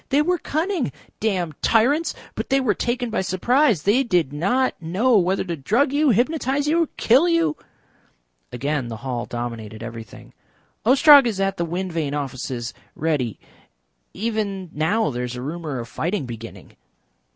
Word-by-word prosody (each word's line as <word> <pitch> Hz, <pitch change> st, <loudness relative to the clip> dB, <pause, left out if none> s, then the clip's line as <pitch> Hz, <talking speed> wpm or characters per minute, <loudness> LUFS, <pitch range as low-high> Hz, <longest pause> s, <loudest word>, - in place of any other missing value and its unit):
They 285 Hz, +2 st, +3 dB
were 355 Hz, +2 st, +1 dB
cunning. 320 Hz, -1 st, -1 dB, 0.3 s
Damned 180 Hz, -8 st, -2 dB
tyrants! 275 Hz, +9 st, +2 dB, 0.2 s
But -, -, -5 dB
they 270 Hz, -, +3 dB
were 250 Hz, -6 st, +2 dB
taken 240 Hz, +2 st, -2 dB
by 220 Hz, -, 0 dB
surprise. 210 Hz, -, +2 dB
They 215 Hz, +7 st, +3 dB
did 175 Hz, -, +1 dB
not 225 Hz, -, +1 dB
know 200 Hz, +10 st, +2 dB
whether 185 Hz, +2 st, +1 dB
to 175 Hz, -2 st, -4 dB
drug 235 Hz, -, +1 dB
you, 295 Hz, 0 st, +3 dB
hypnotise 275 Hz, +4 st, +1 dB
you, 330 Hz, +1 st, +2 dB
kill 270 Hz, +10 st, +4 dB
you." 330 Hz, -2 st, +2 dB, 1.0 s
Again 140 Hz, 0 st, -2 dB
the 115 Hz, -1 st, -6 dB
hall 120 Hz, -2 st, -3 dB
dominated 115 Hz, -2 st, -6 dB
everything. 115 Hz, -2 st, -10 dB, 0.5 s
"Ostrog 280 Hz, +1 st, +8 dB
is 210 Hz, -4 st, -2 dB
at 195 Hz, 0 st, 0 dB
the 170 Hz, -, -1 dB
wind 180 Hz, +2 st, -4 dB
vane 150 Hz, -3 st, -2 dB
offices 130 Hz, -4 st, -4 dB, 0.2 s
ready. 140 Hz, -9 st, -1 dB, 0.7 s
Even 200 Hz, -4 st, -3 dB
now 170 Hz, +7 st, +1 dB
there 125 Hz, 0 st, -3 dB
is 125 Hz, 0 st, -4 dB
a 125 Hz, -, -6 dB
rumour 155 Hz, -1 st, -4 dB
of 120 Hz, -1 st, -5 dB
fighting 170 Hz, -, -2 dB
beginning." 115 Hz, -1 st, -10 dB
190 Hz, 155 wpm, -22 LUFS, -, 1.0 s, Ostrog